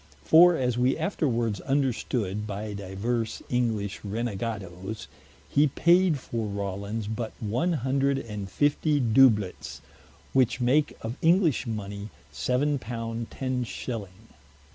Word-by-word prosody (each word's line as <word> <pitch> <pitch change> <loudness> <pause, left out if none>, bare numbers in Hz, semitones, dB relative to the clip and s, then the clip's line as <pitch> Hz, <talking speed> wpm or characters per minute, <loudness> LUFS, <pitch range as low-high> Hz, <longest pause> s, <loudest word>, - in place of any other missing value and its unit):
For 175 +2 +7
as 125 -4 0
we 125 +2 +2
afterwards 120 - -1
understood 120 -6 -1
by 105 +1 -4
divers 100 +4 -3
English 110 -5 -1
Renegadoes, 105 -4 -4 0.4
he 145 +2 +3
paid 170 +3 +3
for 115 -4 -4
Rawlins 100 +2 -4
but 110 +1 -4
one 120 - 0
hundred 135 0 +1
and 105 -6 -5
fiftie 145 - +2
Dooblets, 115 -5 +3 0.5
which 125 -1 +3
make 135 +5 +2
of 115 +3 -4
English 165 - +3
money 105 -1 -5 0.2
seven 140 +3 0
pound 115 -1 -5
ten 130 -1 -2
shilling. 110 -3 -6
115 Hz, 115 wpm, -27 LUFS, 105-135 Hz, 0.5 s, For